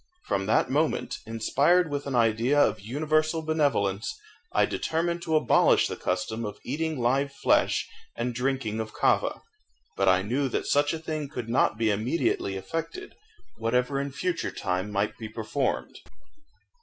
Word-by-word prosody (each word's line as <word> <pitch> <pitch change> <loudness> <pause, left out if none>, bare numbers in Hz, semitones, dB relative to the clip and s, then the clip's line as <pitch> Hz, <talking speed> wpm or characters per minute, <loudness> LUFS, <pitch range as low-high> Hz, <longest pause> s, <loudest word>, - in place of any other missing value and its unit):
From 95 0 -1
that 110 - +2
moment, 150 +3 0
inspired 145 +9 +2
with 145 0 -3
an 135 - -2
idea 115 +4 +3
of - - +3
universal 155 +7 0
benevolence, 140 - 0 0.4
I - - +3
determined 170 +1 -1
to 160 -2 -1
abolish 155 - +4
the - - -4
custom 110 +5 -2
of 105 -2 -5
eating 155 +2 -2
live 135 +4 +1
flesh - - +2 0.3
and 120 +1 -2
drinking 125 -3 -1
of 110 0 -4
kava. - - +1 0.5
But 95 -1 +3
I 95 +1 +4
knew 130 +6 0
that - - -2
such 145 0 +2
a 165 - -2
thing 155 -2 -4
could 125 -6 -6
not 115 -2 +2
be 110 -1 +2
immediately 105 -2 0
effected, 165 - -5 0.5
whatever 125 +4 +1
in 140 0 -4
future 175 +4 -2
time 95 +1 -2
might 105 +3 -1
be 110 -2 -6
performed. 110 +5 -2
130 Hz, 155 wpm, -27 LUFS, 110-155 Hz, 0.5 s, abolish